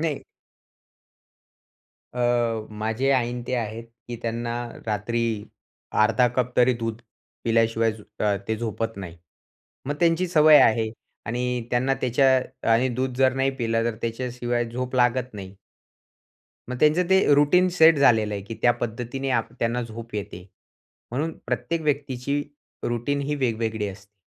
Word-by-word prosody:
नाही. 155 Hz, -3 st, -2 dB, 1.9 s
अ, 120 Hz, -3 st, 0 dB
माझे 110 Hz, +5 st, -1 dB
आई 125 Hz, -3 st, +2 dB
आणि 125 Hz, -1 st, -5 dB
ते 130 Hz, -, -1 dB
आहेत, 115 Hz, -1 st, -3 dB, 0.2 s
की 120 Hz, -, -4 dB
त्यांना 115 Hz, +1 st, -3 dB, 0.3 s
रात्री 110 Hz, +3 st, -1 dB, 0.8 s
1/2 115 Hz, +3 st, +4 dB
कप 125 Hz, -1 st, -1 dB
तरी 125 Hz, +1 st, +5 dB
दूध 115 Hz, -1 st, -4 dB, 0.4 s
पिल्याशिवाय 115 Hz, -1 st, +2 dB
झो 110 Hz, -, -13 dB, 0.2 s
अ, 100 Hz, -1 st, +2 dB
ते 110 Hz, -, 0 dB
झोपत 115 Hz, -1 st, -3 dB
नाही. 90 Hz, -3 st, -8 dB, 0.7 s
मग 145 Hz, -, -1 dB
त्यांची 170 Hz, +1 st, +3 dB
सवय 155 Hz, -3 st, +7 dB
आहे 110 Hz, 0 st, +3 dB, 0.4 s
आणि 125 Hz, +1 st, -2 dB
त्यांना 130 Hz, +2 st, +2 dB
त्याच्या 130 Hz, -1 st, +1 dB
आणि 125 Hz, +3 st, +3 dB
दूध 130 Hz, 0 st, -2 dB
जर 130 Hz, 0 st, +4 dB
नाही 135 Hz, 0 st, +1 dB
पिलं 115 Hz, -2 st, 0 dB
तर 115 Hz, -2 st, -1 dB
त्याच्याशिवाय 120 Hz, 0 st, -2 dB
झोप 125 Hz, +1 st, -4 dB
लागत 125 Hz, -1 st, +1 dB
नाही. 95 Hz, -1 st, -8 dB, 1.2 s
मग 125 Hz, -, -3 dB
त्यांचं 155 Hz, +4 st, +4 dB
ते 190 Hz, 0 st, +5 dB
अ, 145 Hz, -, +5 dB
रूटीन 180 Hz, +6 st, +4 dB
सेट 160 Hz, -3 st, +5 dB
झालेलं 110 Hz, -6 st, +4 dB
आहे, 100 Hz, -, -4 dB
की 110 Hz, +3 st, -7 dB
त्या 120 Hz, -, +5 dB
पद्धतीने 120 Hz, +3 st, -4 dB
आ 125 Hz, -, +3 dB, 0.2 s
त्यांना 120 Hz, +1 st, 0 dB
झोप 115 Hz, 0 st, -9 dB
येते. 95 Hz, -3 st, -6 dB, 0.6 s
म्हणून 155 Hz, +6 st, -2 dB
प्रत्येक 165 Hz, -1 st, -2 dB
व्यक्तीची 140 Hz, -1 st, -1 dB, 0.5 s
रूटीन 120 Hz, +4 st, -1 dB
ही 145 Hz, +1 st, -2 dB
वेगवेगळी 115 Hz, -5 st, -1 dB
असते. 100 Hz, +1 st, -12 dB
120 Hz, 145 wpm, -24 LUFS, 115-135 Hz, 1.9 s, सवय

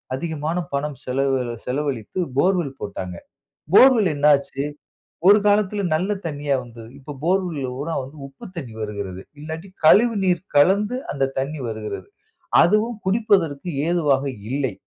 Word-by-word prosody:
அதிகமான 160 Hz, +3 st, -3 dB, 0.2 s
பணம் 140 Hz, -1 st, -2 dB
செலவ் 135 Hz, +1 st, +1 dB, 0.3 s
செலவழித்து 135 Hz, -, -3 dB, 0.2 s
போர்வெல் 170 Hz, -5 st, +1 dB
போட்டாங்க. 95 Hz, -3 st, -5 dB, 0.6 s
போர்வெல் 230 Hz, -6 st, +7 dB
என்ன 145 Hz, 0 st, -1 dB
ஆச்சு? 140 Hz, 0 st, -4 dB, 0.6 s
ஒரு 205 Hz, +2 st, +8 dB
காலத்துல 205 Hz, 0 st, +2 dB
நல்ல 185 Hz, +6 st, 0 dB, 0.2 s
தண்ணீயா 145 Hz, -3 st, -1 dB
வந்தது. 115 Hz, -1 st, -12 dB
இப்ப 140 Hz, +2 st, -9 dB
போர்வெலல் 170 Hz, -8 st, 0 dB
பூராம் 150 Hz, +1 st, -3 dB
வந்து 135 Hz, +4 st, -12 dB
உப்பு 135 Hz, -1 st, -14 dB
தண்ணீர் 115 Hz, -8 st, -7 dB
வருகிறது. 100 Hz, -3 st, -5 dB, 0.2 s
இல்லாட்டி 160 Hz, +4 st, -7 dB, 0.2 s
கழிவு 230 Hz, +8 st, +6 dB
நீர் 180 Hz, -3 st, +1 dB
கலந்து 200 Hz, +10 st, +4 dB, 0.2 s
அந்த 135 Hz, -1 st, 0 dB
தண்ணீர் 135 Hz, 0 st, -3 dB
வருகிறது. 110 Hz, -, -6 dB, 0.5 s
அதுவும் 215 Hz, +4 st, +2 dB
குடிப்பதற்கு 190 Hz, -7 st, +1 dB, 0.2 s
ஏதுவாக 145 Hz, -6 st, +2 dB, 0.3 s
இல்லை. 135 Hz, -4 st, -1 dB
150 Hz, 130 wpm, -22 LUFS, 135-185 Hz, 0.6 s, ஒரு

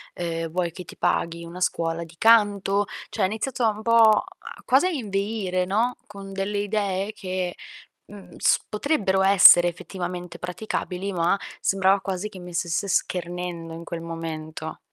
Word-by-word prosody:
Uhm, 165 Hz, -1 st, -3 dB
vuoi 175 Hz, +1 st, -1 dB
che 180 Hz, +2 st, -9 dB
ti -, -, -12 dB
paghi 170 Hz, 0 st, 0 dB
una 170 Hz, +2 st, -9 dB
scuola 165 Hz, -1 st, -1 dB
di 165 Hz, 0 st, -17 dB
canto?" 205 Hz, -2 st, +4 dB, 0.2 s
Cioè -, -, -2 dB
ha -, -, +5 dB
iniziato 225 Hz, +4 st, -1 dB
un 215 Hz, 0 st, -2 dB
po' 225 Hz, -1 st, +5 dB, 0.4 s
quasi 265 Hz, +7 st, +4 dB
a -, -, +1 dB
inveire, 200 Hz, -, -2 dB
no, 225 Hz, +6 st, 0 dB
con 195 Hz, -1 st, -10 dB
delle 195 Hz, +1 st, -2 dB
idee 205 Hz, -1 st, -1 dB
che, 185 Hz, -3 st, -4 dB, 0.5 s
mhmm, 205 Hz, -1 st, -13 dB
s -, -, +3 dB
potrebbero 210 Hz, -5 st, +1 dB
essere 190 Hz, -2 st, +8 dB
effettivamente 175 Hz, 0 st, -6 dB
praticabili, 190 Hz, 0 st, -4 dB
ma 175 Hz, +2 st, +1 dB, 0.2 s
sembrava 195 Hz, 0 st, +3 dB
quasi 190 Hz, +2 st, -3 dB
che 195 Hz, -, -12 dB
mi 180 Hz, 0 st, -9 dB
stesse 170 Hz, +3 st, -1 dB
schernendo 175 Hz, -2 st, -2 dB
in 165 Hz, +1 st, -8 dB
quel 170 Hz, 0 st, -6 dB
momento. 160 Hz, -1 st, -6 dB
190 Hz, 155 wpm, -24 LUFS, 175-205 Hz, 0.5 s, essere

